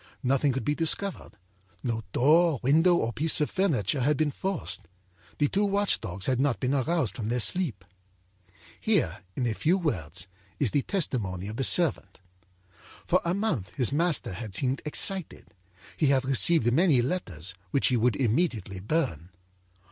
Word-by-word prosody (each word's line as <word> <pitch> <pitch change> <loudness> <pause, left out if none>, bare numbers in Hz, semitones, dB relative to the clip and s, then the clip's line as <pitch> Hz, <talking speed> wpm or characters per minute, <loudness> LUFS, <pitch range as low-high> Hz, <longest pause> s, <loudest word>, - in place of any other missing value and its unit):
Nothing 135 +2 +2
could 130 +1 -4
be 145 - +1
discovered. 165 - 0 0.5
No 115 -3 -2
door, 155 +1 +3
window 165 +7 +4
or 115 -7 -1
piece 160 +6 +2
of 150 - -1
furniture 145 - 0
had 145 +3 +1
been 155 -2 0
forced. 120 - -4 0.5
The 145 - +2
two 200 +7 0
watch 200 0 +1
dogs 95 -3 -6
had 130 -1 0
not 135 -2 0
been 130 +1 -1
aroused 140 - 0
from 110 -2 -4
their 125 +1 0
sleep. 120 - -1 1.0
âHere, 105 - 0
in 125 - -2
a 115 - 0
few 165 - +1
words, 95 - -3 0.3
is 130 -8 +2
the 145 - +1
testimony 105 - -2
of 110 +2 -6
the 135 - -1
servant: 170 +2 +2 0.9
âFor - - +2
a 170 +1 -1
month 145 - -3
his 125 - +3
master 160 - 0
had 100 +1 -5
seemed 130 +5 +1
excited. 185 +4 +1 0.4
He 155 - +1
had 135 -1 +2
received 135 -1 +4
many 150 -5 +3
letters, 95 - -3 0.2
which 135 - +2
he 125 - +1
would 120 0 +1
immediately 115 - -1
burn. 100 - -2
135 Hz, 165 wpm, -27 LUFS, 110-165 Hz, 1.0 s, window